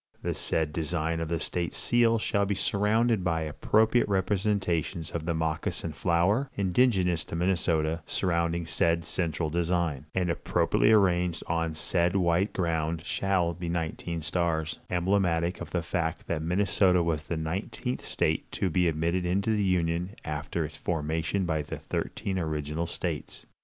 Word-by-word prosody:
The - - 0
said 80 -2 -1
design 80 0 -1
of 80 - -2
the 85 -1 0
state 85 +1 -3
seal 120 -1 +3
shall 100 -2 0
be 100 - 0
surrounded 105 +2 +2
by 85 -2 0
appropriate 110 +9 +2
representations 95 -4 0
of 80 -1 -4
the 85 - +1
moccasin 80 0 -2
flower, 90 - +2
indigenous 95 -4 +2
to - - -6
Minnesota, 85 -2 +1
surrounding 85 -2 0
said 85 0 +1
central 80 -3 -1
design, 85 -4 0
and 90 -2 +1
appropriately 105 - +2
arranged 90 -5 +3
on 85 -1 -1
the - - -10
said 85 +3 +1
white 90 +2 +2
ground 80 -2 -1
shall 95 -4 +1
be 85 0 -5
nineteen 85 0 -3
stars, 85 -1 -1
emblematic 90 -1 +1
of - - -6
the 85 -2 -1
fact 85 -1 -2
that 80 -2 -2
Minnesota 90 +1 +3
was 80 -3 0
the 80 +2 -4
nineteenth 90 +9 -3
state 80 0 -1
to 95 - 0
be 90 +1 +3
admitted 85 +3 0
into 95 +5 +1
the 105 - +1
Union 90 +1 0
after 75 +2 -2
its 75 0 -8
formation 80 +4 -1
by 80 -3 0
the 75 - -6
thirteen 95 -2 -3
original 80 0 -2
states. - - -4
85 Hz, 150 wpm, -28 LUFS, 80-95 Hz, -, seal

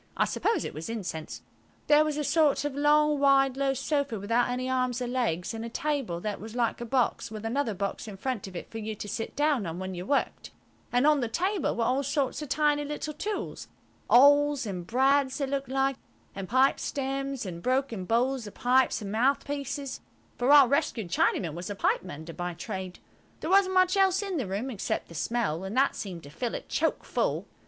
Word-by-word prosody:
I - - +3
suppose 450 - 0
it - - -5
was 155 +7 -6
incense. 185 -8 -5 0.4
There 300 +1 +6
was 305 -1 -2
a 300 - -1
sort 300 -1 +2
of 290 - -2
long, 295 +1 +3
wide, 270 -2 +4
low 270 0 0
sofa, 280 -5 -1
without 230 +5 +1
any 250 +1 -2
arms 255 -1 0
or 250 - -2
legs, 235 -8 -1
and 225 0 -5
a 230 - -5
table 270 - -2
that 210 0 -3
was 220 +2 -8
like 240 -1 0
a - - -3
box, 245 -1 0
with 215 0 -7
another 230 -2 -1
box 200 +3 -3
in 200 -2 -8
front 235 -1 -3
of 190 - -11
it - - -7
for 225 - -5
you 215 0 -4
to 205 - -7
sit 225 +2 -4
down 290 - +1
on 165 +1 -5
when 190 0 -5
you 180 0 -5
worked, 280 - -1 0.4
and 245 +3 +3
on 300 -1 +5
the 240 - -1
table 370 - 0
were 230 - 0
all 255 +4 +1
sorts 280 0 -1
of 300 - -6
tiny 295 +1 +2
little 295 +1 -4
tools–awls 290 - +2
and 180 -4 -5
brads 265 +2 +2
they 285 - 0
looked 275 -1 -3
like–and 270 -7 -3
pipe 260 +3 +3
stems 275 -2 -3
and 170 -2 -6
broken 255 -5 0
bowls 240 +3 0
of 205 - -11
pipes 250 -2 +2
and 200 - -5
mouthpieces, 275 +3 -1 0.3
for 245 +2 0
our 285 -3 +9
rescued 255 - 0
Chinaman 170 -2 +1
was 175 +4 -6
a 205 - -4
pipe - - +1
mender 165 -2 -8
by 175 0 -4
trade. 185 +2 -6 0.4
There 320 - -3
wasn't 380 -1 +4
much 370 +1 +4
else 385 0 +3
in 390 -3 -3
the 255 -8 -2
room 205 +8 -3
except 210 - -3
the - - -11
smell, 190 -2 -1
and 195 +6 -4
that 275 +1 +3
seemed 180 -5 -6
to 145 - -11
fill 235 +9 -3
it - - -7
choke - - 0
full. - - -1
255 Hz, 210 wpm, -28 LUFS, 210-285 Hz, 0.4 s, our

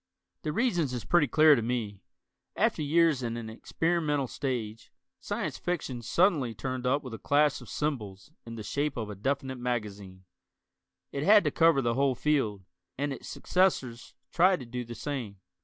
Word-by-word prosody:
The 155 - -2
reasons 170 - 0
is 120 - -5
pretty 175 -4 +3
clear 155 +3 +6
to 125 - +2
me. 110 -4 -3 0.5
After - - +1
years 155 -1 +3
in 115 -1 -3
an 110 -1 -6
experimental 150 +3 -1
stage, 115 -5 -4 0.3
Science - - -4
Fiction 150 -8 -3
suddenly 140 - +2
turned 130 +2 -3
up 140 +3 +1
with 130 -3 -8
a 115 - -6
clash 145 0 +2
of - - -12
cymbals 125 -6 -4
in 115 0 -8
the 110 - -7
shape 145 +5 -2
of 110 -2 -4
a - - -7
definite 130 +4 -2
magazine. 105 -6 -4 0.9
It 140 - -3
had 205 +6 +6
to - - 0
cover 165 -5 +4
the 120 0 +1
whole 135 +1 +1
field, 115 -10 0 0.3
and 145 +1 -1
its - - -9
successors 135 -10 0 0.2
tried 180 -2 +3
to - - -7
do 125 +1 -5
the 120 0 -8
same. 125 -9 -5
130 Hz, 175 wpm, -29 LUFS, 115-150 Hz, 0.9 s, clear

